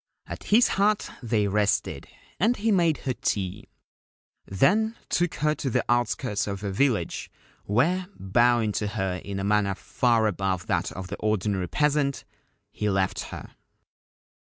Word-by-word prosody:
At - - -8
his 230 +4 +5
hut 205 +2 +1
they 110 -4 +1
rested, 105 0 0 0.3
and 225 +7 +3
he 220 +2 +1
made 170 -6 +3
her 130 - 0
tea; 100 -3 -3 0.8
then 210 - +2
took 175 -1 0
her 150 0 +1
to 140 - -3
the - - 0
outskirts 120 -2 0
of 100 -1 -4
her 100 -2 -3
village, 110 -5 0 0.4
where, 170 - +1
bowing 115 +3 +2
to 105 +1 -2
her 95 -3 -2
in 100 -1 -5
a - - -3
manner 100 -1 +2
far 120 0 +1
above 95 -3 -1
that - - -1
of 95 0 -7
the 100 - -5
ordinary 100 -3 0
peasant, 140 - 0 0.5
he 105 - -2
left 95 -1 0
her. - - -9
110 Hz, 150 wpm, -26 LUFS, 100-145 Hz, 0.8 s, his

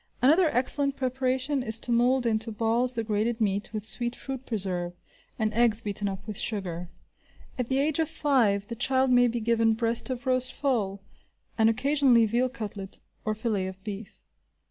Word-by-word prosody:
Another 315 +7 +5
excellent 275 +3 0
preparation 260 +1 -1
is 225 -2 -1
to 240 - -5
mould 245 +2 +3
into 225 0 0
balls 230 +3 +2
the 230 -2 -2
grated 220 +2 -1
meat, 200 -2 -1
with 215 -2 -3
sweet 240 +1 +1
fruit 265 -1 -7
preserve, 185 -5 -2 0.4
and 215 -1 0
eggs 230 -1 +3
beaten 205 0 -3
up 195 0 -5
with 215 -2 -3
sugar. 180 -5 -3 0.7
At 245 - -2
the 265 - +1
age 290 +2 +1
of 320 -1 +1
five, 245 -11 +2
the 235 - -6
child 260 +2 +2
may 245 0 +5
be 240 0 -2
given 225 0 +2
breast 230 +2 0
of 255 +1 -4
roast 255 -1 +1
fowl, 205 -8 -1 0.5
and 225 -1 +4
occasionally 255 -1 +3
veal 240 +4 +1
cutlet 205 -6 -6 0.3
or 215 0 0
filet 210 -4 -1
of 190 0 -9
beef. 210 0 -8
230 Hz, 175 wpm, -27 LUFS, 210-255 Hz, 0.7 s, Another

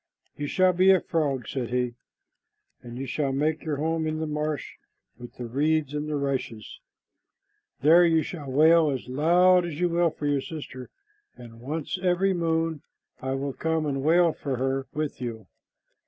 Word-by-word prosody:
"You 145 - -4
shall 185 +4 +3
be 185 +2 +4
a 190 -1 +6
frog," 145 -8 -2
said 125 -4 -3
he, 125 0 -1 0.9
"and 120 0 -9
you 135 - -4
shall 135 +2 -1
make 150 +3 -1
your 155 -2 -2
home 160 +2 -1
in 155 0 -2
the 160 - -2
marsh 150 -1 -3 0.5
with 120 0 -11
the 125 - -6
reeds 145 +4 0
and 150 +1 -3
the 150 - -1
rushes. 135 -6 -4 1.0
There 165 +5 +6
you 165 -2 +3
shall 150 -6 -7
wail 160 +3 +5
as 130 -3 -4
loud 175 +7 +4
as 170 -3 -5
you 180 0 +2
will 170 0 +2
for 150 -1 -7
your 145 -1 +1
sister, 135 -4 -8 0.5
and 115 -1 -13
once 155 +6 -4
every 190 +1 +2
moon 165 -3 -1 0.4
I 130 0 -2
will 135 0 -3
come 160 +1 -1
and 135 -2 -2
wail 165 +3 +4
for 140 -3 -4
her 135 +1 -2
with 150 -3 -4
you. 115 -4 -5
150 Hz, 175 wpm, -26 LUFS, 135-165 Hz, 1.0 s, a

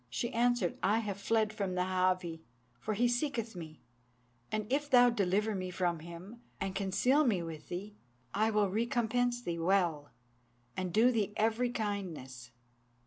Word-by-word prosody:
She 235 - -3
answered, 245 +2 +1
'I 210 +3 +3
have 205 -3 -3
fled 220 +1 +1
from 200 -4 -2
the 180 - +1
Háwee, 185 -2 0 0.4
for 215 - -2
he 240 +4 +3
seeketh 240 -3 -1
me; 160 -3 -9 0.7
and 215 -1 -1
if 290 +1 0
thou 245 -2 +7
deliver 210 0 +1
me 185 -2 -3
from 175 -2 -1
him, 170 +8 -10 0.2
and 195 -1 -2
conceal 205 +9 +2
me 205 - +1
with 160 -2 -8
thee, 205 +4 -6 0.4
I 215 +2 +2
will 210 -2 +2
recompense 240 +2 0
thee 170 -5 -3
well, 165 -5 +1 0.7
and 185 -1 -2
do 225 +7 +5
thee 210 -4 0
every 225 +3 +2
kindness.' 180 - -4
205 Hz, 155 wpm, -32 LUFS, 180-235 Hz, 0.7 s, thou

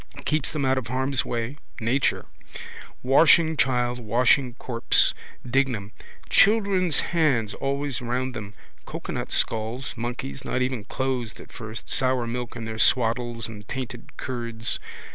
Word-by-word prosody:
Keeps 155 -2 +1
them 145 -3 -1
out 130 0 +3
of 120 - -8
harm's 130 +2 0
way. 120 +4 -3 0.2
Nature. 125 +4 +1 0.8
Washing 160 +4 +5
child, 125 -3 +1
washing 120 +3 +3
corpse. 120 -3 +2 0.3
Dignam. 120 -5 0 0.4
Children's 195 -6 +4
hands 135 -11 +2
always 140 -1 -2
round 125 +2 -2
them. 105 -2 -7 0.3
Cocoanut - - -5
skulls, 115 +4 -1
monkeys, 115 - -5
not 130 - 0
even 125 -5 -2
closed 125 -2 -2
at - - -12
first, 110 -2 -7
sour 130 -2 +2
milk 120 +1 -4
in 115 -1 -5
their 110 0 -5
swaddles 120 -1 +2
and 105 -2 -10
tainted 125 -2 -6
curds. 115 -3 -3
125 Hz, 130 wpm, -25 LUFS, 115-135 Hz, 0.8 s, Washing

